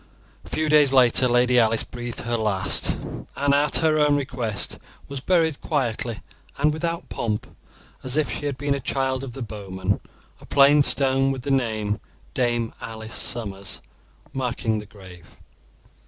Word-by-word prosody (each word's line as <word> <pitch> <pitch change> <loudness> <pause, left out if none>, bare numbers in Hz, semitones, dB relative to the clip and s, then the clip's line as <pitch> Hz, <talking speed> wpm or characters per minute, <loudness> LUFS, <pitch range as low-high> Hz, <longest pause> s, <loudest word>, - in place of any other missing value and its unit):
A - - -14
few 155 - -1
days 150 -2 +5
later 130 -1 +5
Lady 125 0 +4
Alice 115 -1 +3
breathed 120 -1 -6
her 120 0 -2
last, 105 -5 +1 0.4
and 140 0 +2
at 145 0 +3
her 155 -1 +3
own 150 -1 +4
request 125 -9 -1 0.3
was 140 -1 -5
buried 160 -1 +1
quietly 120 -6 -2 0.4
and 150 +2 +2
without 165 +2 -3
pomp, 105 -3 -3 0.6
as 130 +2 -1
if 155 - +1
she 145 - -3
had 140 -2 -3
been 145 +1 0
a 140 - -2
child 130 0 -1
of 130 -3 -7
the 135 - -5
bowman, 100 -2 -3 0.4
a - - -15
plain 140 +1 +6
stone, 135 -1 +3
with 130 -2 -5
the 140 - -2
name 110 -5 0 0.3
"Dame 120 -2 0
Alice 110 0 -7
Somers", 100 -4 -2 0.5
marking 120 -4 -1
the 105 - -10
grave. 90 -5 -14
125 Hz, 155 wpm, -24 LUFS, 110-140 Hz, 0.6 s, plain